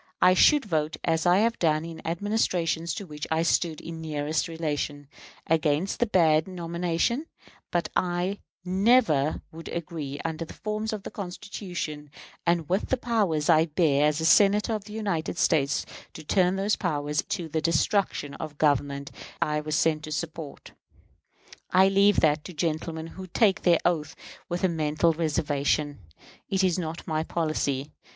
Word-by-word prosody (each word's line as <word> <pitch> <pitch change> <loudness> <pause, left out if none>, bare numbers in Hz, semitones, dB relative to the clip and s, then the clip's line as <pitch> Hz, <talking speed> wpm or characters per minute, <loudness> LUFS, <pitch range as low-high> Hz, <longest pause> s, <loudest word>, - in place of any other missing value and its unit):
I 185 - +6
should 290 - +5
vote, 155 -5 -1
as 165 0 +1
I 175 +1 +5
have 230 +1 +1
done 155 -1 +2
in 165 -1 -8
Administrations 170 -3 0
to 200 - -6
which 150 -3 -7
I 160 +1 +1
stood 165 -1 +1
in 165 -1 -8
nearest 155 0 -1
relation, 150 -3 -3 0.4
against 160 +5 +1
a 240 - +3
bad 160 -5 +3
nomination; 175 - -1 0.4
but 175 -1 0
I 180 +2 0 0.3
never 185 - +3
would 165 +1 -9
agree, 155 -4 -5
under 165 0 -2
the 165 - -10
forms 215 +1 -3
of 210 -3 -5
the - - -7
Constitution, 175 -5 -6 0.4
and 170 -2 +2
with 190 +4 0
the 260 - +2
powers 205 -11 0
I 160 -1 +5
bear 150 -3 +3
as 150 +1 0
a 160 - -1
Senator 205 +5 +5
of 210 -2 -4
the 210 - -10
United 195 -7 -2
States, 140 -5 +2 0.3
to 160 - -9
turn 180 +3 +2
those 200 +2 +1
powers 150 -5 -1
to 170 - -4
the 160 0 -2
destruction 165 -2 +1
of 155 -2 -6
the - - -27
Government 140 -1 0 0.3
I 150 -2 0
was 155 0 -2
sent 155 -1 +2
to 155 - -8
support. 160 -1 -6 1.0
I 190 +1 +5
leave 200 +1 +4
that 150 -1 +3
to 180 - -8
gentlemen 160 0 -2
who 185 +3 -9
take 195 +2 +2
the 175 -2 +4
oath 155 -3 0 0.3
with 175 +2 -3
a - - +5
mental 160 0 +1
reservation. 145 -2 0 0.5
It 190 0 +1
is 185 -1 +2
not 165 -1 -5
my 155 -1 -1
policy. 155 -4 -2
165 Hz, 165 wpm, -26 LUFS, 155-185 Hz, 1.0 s, I